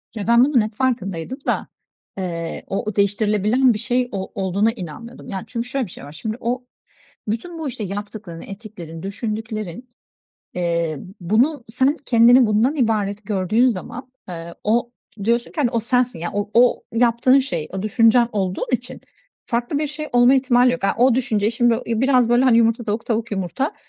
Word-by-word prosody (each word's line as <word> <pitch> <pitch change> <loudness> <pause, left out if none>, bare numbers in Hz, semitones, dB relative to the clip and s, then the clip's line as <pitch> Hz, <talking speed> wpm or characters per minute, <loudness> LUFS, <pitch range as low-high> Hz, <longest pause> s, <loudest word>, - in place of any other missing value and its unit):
Ya, 210 -2 -4
ben 235 +1 +6
bunun 270 -4 +3
hep 215 +1 -3
farkındaydım 230 - -2
da, - - 0 0.5
eee, 170 -3 -4
o 195 - -2
o 215 -2 -4
değiştirilebilen 210 +5 +2
bir 210 - -4
şey 245 +1 0
o 190 -2 -5
olduğuna 200 +2 +1
inanmıyordum. 225 +4 -9
Yani, 190 -2 -4
çünkü 235 0 -4
şöyle 270 -1 -1
bir 180 - -12
şey - - -10
var. 145 - -10
Şimdi 215 +9 -5
o 245 +2 -2 0.6
bütün 325 +11 -4
bu, 315 - -3
işte, 235 -4 -5
yaptıkların, 205 -3 -6
ettiklerin, 195 -6 -9
düşündüklerin, 215 +1 -5 0.7
eee, 170 -3 -1 0.2
bunu 230 - +1
sen 260 +6 +1
kendini 240 +1 +6
bundan 220 +8 +2
ibaret 210 -5 0
gördüğün 215 +4 +2
zaman, 245 +4 -5 0.2
eee, 170 -1 -7
o 235 +3 +1 0.3
diyorsun 235 +2 0
ki, - - -18
hani, 250 -5 +2
o 235 -2 0
sensin. 245 -2 0
Yani, 175 +1 -4
o 205 0 -2
o 245 +1 +4
yaptığın 235 +3 +4
şey 175 - -2
o 190 0 -4
düşüncen 230 +2 +4
olduğun 190 -3 -1
için 250 0 -3 0.5
farklı 240 +4 -1
bir 305 - -1
şey 300 +1 -6
olma 245 +2 +6
ihtimali 250 -2 +4
yok. 250 -4 -4
A, 195 - +2
o 250 0 +5
düşünce 220 -4 +1
şimdi 235 0 +2
i 230 -1 -1
biraz 255 -3 +3
böyle, 240 +2 +4
hani, 245 -3 +5
yumurta 230 +1 +2
tavuk 220 +1 -3
tavuk 230 0 -1
yumurta, 200 - -2
230 Hz, 180 wpm, -21 LUFS, 200-250 Hz, 0.7 s, ben